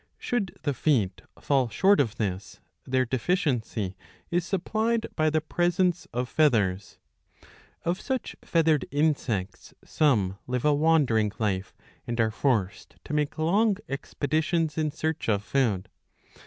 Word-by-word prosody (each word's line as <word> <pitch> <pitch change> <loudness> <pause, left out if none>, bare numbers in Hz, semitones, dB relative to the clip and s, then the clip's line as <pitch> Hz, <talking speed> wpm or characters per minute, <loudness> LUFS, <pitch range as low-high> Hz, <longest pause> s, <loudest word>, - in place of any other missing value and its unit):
Should 210 -7 -2
the 145 - 0
feet 115 - +1 0.2
fall 135 -4 +1
short 195 - +4
of 120 -5 +1
this, 100 -4 -4 0.3
their 130 0 +2
deficiency 120 - -1 0.4
is 175 0 +1
supplied 220 +5 0
by 155 -1 +2
the 155 +1 +1
presence 175 +2 0
of 125 +1 -2
feathers. 105 -11 +1 0.9
Of 175 +2 -1
such 265 -2 -3
feathered 160 -4 +2
insects 135 -10 -1
some 105 -11 +1
live 125 +1 -2
a 150 - +5
wandering 145 -9 +3
life 100 -4 -2 0.3
and 120 0 -3
are 110 -1 +3
forced 110 -6 -1
to - - -7
make 150 +1 0
long 195 +6 +2
expeditions 155 +3 -1
in 155 -1 0
search 155 -2 -3
of 105 -1 +1
food. 110 -8 0
145 Hz, 130 wpm, -27 LUFS, 110-165 Hz, 0.9 s, a